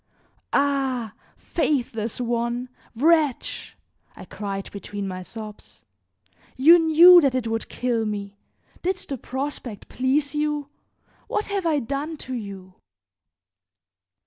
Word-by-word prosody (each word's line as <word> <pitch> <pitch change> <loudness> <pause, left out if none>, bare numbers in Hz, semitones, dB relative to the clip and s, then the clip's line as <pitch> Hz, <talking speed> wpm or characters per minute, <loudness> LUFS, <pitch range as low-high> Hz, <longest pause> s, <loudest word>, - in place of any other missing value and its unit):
"Ah! 270 -6 0 0.2
faithless 240 -9 -1
one! 240 +1 -1 0.3
wretch!" 305 0 +1 0.4
I - - -10
cried 195 -2 -5
between 200 0 -6
my 185 -1 -5
sobs, 215 +2 -10 0.7
"you 325 +7 +8
knew 340 +2 +8
that 275 -4 +2
it 255 -2 -1
would 225 0 -3
kill 235 -3 -1
me. 200 -1 -5 0.4
Did 375 +1 0
the 275 -7 -6
prospect 265 -5 -5
please 275 +3 0
you? 295 -1 -1 0.6
What 425 - -1
have 385 -4 0
I 310 -2 +2
done 285 +5 -3
to 260 - -7
you?" 195 -5 -7
255 Hz, 115 wpm, -24 LUFS, 220-295 Hz, 0.7 s, you